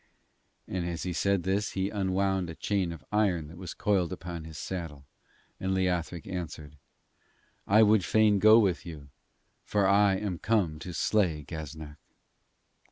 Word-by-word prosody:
And 95 -2 -3
as 85 -1 -4
he 90 - -3
said 100 0 +1
this 95 +3 -1
he 95 +1 -1
unwound 95 -2 0
a 85 - -7
chain 95 -3 -1
of 80 -3 -10
iron 95 -8 +1
that 85 - -12
was 95 -2 -7
coiled 95 -5 +1
upon 85 -2 -6
his 80 -1 -9
saddle, 80 -5 -6 0.5
and 95 0 -1
Leothric 90 -3 -1
answered: 80 -5 -6 0.9
'I 105 +3 +6
would 105 -2 +4
fain 105 +2 +3
go 110 +2 +7
with 95 -9 +2
you, 75 -5 -10 0.5
for 100 -2 +1
I 100 0 +4
am 95 -3 -3
come 90 -7 0
to 90 +2 -7
slay 90 -8 +1
Gaznak.' 80 -1 -8
90 Hz, 155 wpm, -29 LUFS, 80-100 Hz, 0.9 s, go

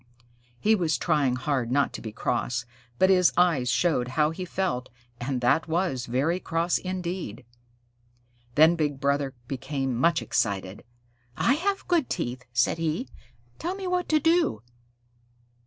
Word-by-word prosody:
He 220 - +3
was 170 -7 +1
trying 145 -6 +1
hard 130 -2 -1
not 140 +2 +2
to - - -6
be 110 - -6
cross, 120 +2 -2 0.3
but 190 +7 +4
his 180 -2 +5
eyes 165 -9 +3
showed 125 -3 +1
how 150 +4 +1
he 180 +3 -5
felt, 175 -9 -2 0.3
and 125 +1 -2
that 125 +7 +2
was 160 -7 -1
very 140 +9 0
cross 165 0 0
indeed. 180 - -5 1.1
Then 160 +3 +6
Big 145 -4 -1
Brother 140 -1 0
became 135 -1 -3
much 165 +7 +2
excited. 95 -2 -1 0.5
"I 245 - +3
have 390 +7 -1
good 345 -6 +2
teeth," 125 -7 -3
said 120 +7 +1
he, 165 - -2 0.5
"Tell 355 +3 -2
me 390 -1 -6
what 360 -1 -1
to 310 - +4
do." 325 - +2
155 Hz, 145 wpm, -26 LUFS, 125-185 Hz, 1.1 s, Then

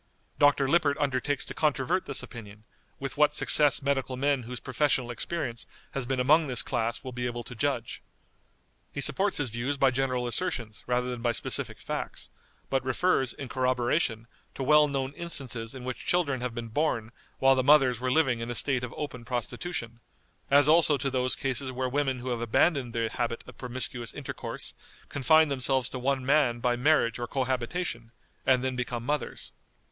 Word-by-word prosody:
Dr. 145 -1 +4
Lippert 145 -1 +2
undertakes 145 0 -1
to - - -7
controvert 155 +4 0
this - - -2
opinion, 105 -4 -11 0.4
with 135 0 -5
what 150 0 +4
success 145 -1 +5
medical 135 -2 -1
men 140 0 +1
whose 125 +1 -7
professional 130 -2 0
experience 120 -2 -4 0.2
has 135 -3 -3
been 135 0 -1
among 150 +5 +4
this 125 -2 +2
class 115 -2 -2
will 130 - -6
be 125 0 -3
able 120 0 -4
to 125 - -10
judge. 125 -2 -2 0.9
He - - -6
supports 195 +8 +3
his 130 -6 0
views 125 +5 -2
by 135 -1 +4
general 130 -1 -1
assertions 120 -5 -2
rather 125 0 0
than 120 -1 -5
by 120 0 +1
specific - - 0
facts, - - -5 0.4
but 135 -1 0
refers, 130 -1 +1
in 140 - -7
corroboration, 125 -1 0 0.3
to 135 - -3
well 150 +2 +5
known 135 -1 -2
instances 135 -8 -3
in 130 - -8
which 130 0 -5
children 145 -8 +1
have 125 -2 -3
been 115 -1 -5
born 115 -4 -1 0.3
while 135 0 +5
the 130 - +2
mothers 135 -4 +5
were 130 +1 -1
living 130 -5 +2
in 115 +1 -5
a 120 - -3
state 130 -1 +1
of 125 - -6
open 130 -5 -5
prostitution, 120 0 -4 0.5
as 145 +1 +5
also 155 -2 +5
to 135 +1 -2
those 130 -3 +1
cases 135 0 -1
where 130 0 -2
women 130 -1 -1
who 130 - -4
have 120 -2 -2
abandoned 125 +2 +1
the 115 -1 +1
habit 115 +1 -3
of - - -12
promiscuous 125 -2 -3
intercourse - - -5 0.4
confine 155 +3 +4
themselves 130 -1 +1
to 130 - -6
one 130 0 0
man 135 -4 +3
by 120 0 +1
marriage 125 -3 +2
or 120 - -3
cohabitation, 130 -1 -2 0.4
and 130 -1 +4
then 130 -1 -1
become 120 -1 -3
mothers. 145 0 -3
130 Hz, 180 wpm, -28 LUFS, 120-145 Hz, 0.9 s, success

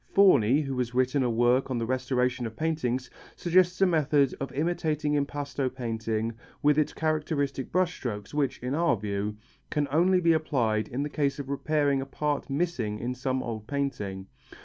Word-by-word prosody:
Forni, 145 - +5
who 135 -2 -3
has 125 -1 -2
written 130 +2 +2
a 125 - +1
work 120 +3 +2
on 130 - -1
the 115 - -1
restoration 125 0 0
of 110 - -9
paintings, 130 -5 -1 0.3
suggests 180 +1 +2
a - - +7
method 150 -5 +3
of 135 - -4
imitating 155 -1 0
impasto 140 -2 -1
painting 115 -3 -2 0.3
with 150 +1 +4
its 150 - +1
characteristic 150 -4 -1
brush 180 0 +2
strokes 105 -3 -5
which, 145 -3 0
in 125 +2 -2
our 155 -6 +2
view, 105 +1 -3 0.3
can 145 -1 0
only 180 +5 +4
be 170 -2 +4
applied 120 -9 0
in 130 +4 -3
the - - -2
case 140 -2 0
of 140 -2 -6
repairing 140 -1 +1
a 135 - -6
part 145 +1 -2
missing 135 -8 -1
in 120 +3 -3
some 130 +1 -2
old 110 -2 -5
painting. 105 -10 -3
135 Hz, 175 wpm, -28 LUFS, 120-150 Hz, 0.3 s, a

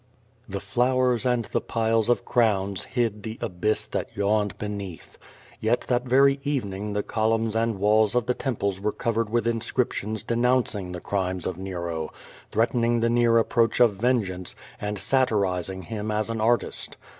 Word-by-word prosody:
The 100 0 -3
flowers 125 +4 +1
and 120 -2 +1
the - - -1
piles 115 0 +1
of 120 - +2
crowns 100 -5 +1
hid 115 -4 -1
the 110 +2 -6
abyss 105 -1 0
that - - -3
yawned 105 0 +1
beneath. 100 -5 -7 0.4
Yet 115 +2 +1
that 125 0 +1
very 135 +2 +4
evening 105 -8 -2
the 105 0 -1
columns 110 0 0
and 115 -2 +1
walls 105 +2 +3
of 125 -2 +2
the 125 - +1
temples 100 -8 -2
were 105 +1 0
covered 115 -2 -1
with 115 0 0
inscriptions 115 -2 -1
denounc 125 +2 +2
ing 95 -4 -5
the 90 -1 -6
crimes 95 -2 -2
of 90 -1 -3
Nero, 85 -4 -4 0.4
threatening 115 0 +2
the 115 0 +2
near 120 -1 +4
approach 115 +1 +2
of 115 -5 +5
ven 120 +2 +2
geance, 90 -1 -7 0.3
and 105 0 -2
satirizing 95 -5 0
him 110 -1 -4
as 110 +1 -1
an 110 -1 -3
artist. 120 +2 0
110 Hz, 165 wpm, -25 LUFS, 100-120 Hz, 0.4 s, of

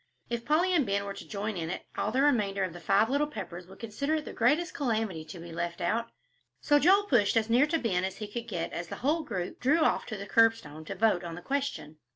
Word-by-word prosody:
If 235 0 -2
Polly 345 +5 +3
and 325 -5 +4
Ben 200 -2 -1
were 200 - -4
to - - -10
join 210 +1 -3
in 165 -1 -3
it, - - -5
all 215 - -1
the 260 +4 +2
remainder 205 -9 +2
of 185 -3 -3
the 175 - -9
"Five 195 +6 +3
Little 285 +4 +1
Peppers" 180 - -7
would 190 - -13
consider 245 +7 -2
it 305 -1 -3
the - - -7
greatest 310 +9 +2
calamity 220 - -1
to 160 +3 -9
be 170 0 -9
left 170 +1 -3
out, 230 +7 -1 0.5
so 290 -1 +4
Joel 385 +7 +5
pushed 235 - +3
as 225 0 +1
near 255 +5 +5
to 330 +2 +1
Ben 190 - 0
as 190 0 -3
he 210 - -5
could 235 +3 -6
get 175 -7 -3
as 170 - -4
the - - -6
whole 315 +4 +2
group 185 - -5
drew 295 +6 +3
off - - +2
to 215 - -5
the 200 - -6
curbstone 200 -9 +2
to 195 - -5
vote 195 -3 +2
on 170 -1 -6
the 175 - -8
question. 270 - -3
220 Hz, 255 wpm, -29 LUFS, 180-280 Hz, 0.5 s, Joel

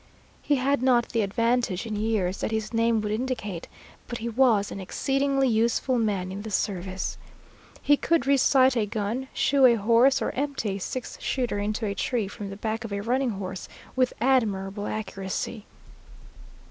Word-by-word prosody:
He 290 - +2
had 275 0 +1
not 250 -2 +3
the 230 - 0
advantage 230 0 0
in 220 -2 -4
years 205 -3 0
that - - -1
his 220 0 -3
name 230 -1 +2
would 210 0 -3
indicate, 215 -6 -3 0.4
but 240 - -4
he 235 +1 -4
was 230 -4 +3
an - - -6
exceedingly 270 +7 0
useful 235 +2 +1
man 195 -5 -1
in 195 +2 -5
the 220 - -6
service. 190 -2 -2 0.6
He 290 0 +5
could 335 +2 +1
resight 265 -1 +4
a 220 -3 +1
gun, 220 +5 -3
shoe 270 -1 +4
a 235 - +5
horse, 230 +5 +4
or - - -1
empty 265 -8 -2
a - - -7
six 255 +6 -5
shooter 245 -5 -1
into 215 +2 -2
a 200 - -1
tree 220 +2 -1
from 205 0 -7
the 195 - -7
back 220 +1 -3
of 225 - -6
a 200 0 -2
running 250 +4 0
horse 185 -1 -6 0.3
with 255 -1 +2
admirable 210 -5 +1
accuracy. 200 +1 -4
225 Hz, 170 wpm, -26 LUFS, 205-255 Hz, 0.6 s, He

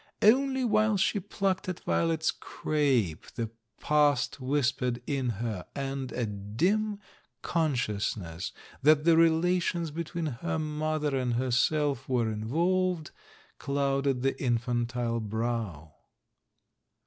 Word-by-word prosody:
Only 265 +3 +4
while 215 -1 +3
she 200 +2 +2
plucked 190 0 -1
at 180 - -4
Violet's 165 -1 +1
crape, 130 - 0
the 115 -2 -3 0.3
past 145 -3 +2
whispered 130 -2 0
in 135 -3 -1
her, 110 -4 -3
and 135 -2 -3
a 120 -1 -1
dim 165 - 0 0.5
conscious 125 -12 0
ness 85 -3 -6 0.3
that 150 +1 +5
the 165 0 +5
relations 165 0 +2
between 165 +1 -4
her 155 +4 -2
mother 155 -1 -1
and 125 -2 0
herself 135 +2 +1
were 120 -3 +1
involved 165 +9 0 0.5
clouded 140 -2 0
the 135 - 0
infantile 120 -1 0
brow. 110 -8 -3
140 Hz, 110 wpm, -29 LUFS, 120-165 Hz, 0.5 s, that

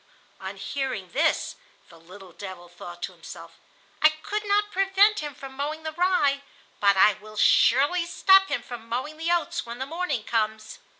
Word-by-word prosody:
On 195 +1 -7
hearing 250 -3 -4
this, 310 +2 0 0.3
the 165 - -16
little 185 +3 -14
devil 185 -1 -9
thought 175 0 -11
to - - -3
himself: - - -12 0.4
"I 310 - +7
could 360 +7 -5
not 415 +1 +1
prevent 390 +2 +3
him 295 -2 -6
from 270 0 -10
mowing 300 +3 -4
the 315 - -4
rye, 315 -5 +1 0.4
but 200 -1 +4
I 210 +2 +6
will 215 +1 -14
surely 290 +13 +4
stop 385 +2 +5
him 245 - -3
from 235 -2 -10
mowing 260 +6 -4
the 325 +2 -3
oats 340 0 0
when 235 0 -8
the 260 - -4
morning 310 -6 -3
comes." 220 -1 -2
275 Hz, 175 wpm, -25 LUFS, 215-340 Hz, 0.4 s, I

